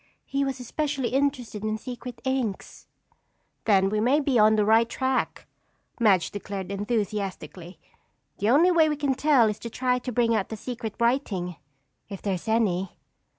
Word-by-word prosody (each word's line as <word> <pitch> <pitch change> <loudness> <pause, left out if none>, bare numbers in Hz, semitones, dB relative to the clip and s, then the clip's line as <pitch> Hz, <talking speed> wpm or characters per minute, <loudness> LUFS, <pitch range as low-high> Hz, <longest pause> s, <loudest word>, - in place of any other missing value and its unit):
He 275 0 -1
was 270 -1 -3
especially 275 +1 -2
interested 260 -6 -1
in 215 0 -1
secret 245 +1 -8
inks." 260 -6 -3 0.8
"Then 195 -3 +4
we 210 +1 0
may 255 +7 +3
be 275 -5 +1
on 215 +1 +6
the 210 -1 +2
right 225 +2 +4
track," 260 +1 -1 0.5
Madge 195 -8 +3
declared 200 -2 -6
enthusiastically. 200 -4 -3 0.6
"The 205 - +1
only 320 +9 +5
way 320 -3 +4
we 300 - 0
can 285 -2 0
tell 265 -4 +4
is 210 0 -2
to 235 - -6
try 250 +1 0
to 250 +1 -5
bring 235 -1 +2
out 210 -4 0
the 220 - -5
secret 230 -2 -6
writing, 220 - 0 0.5
if 195 -2 -6
there 200 - -2
is 180 +4 -6
any." 195 -5 0
230 Hz, 165 wpm, -26 LUFS, 205-260 Hz, 0.8 s, on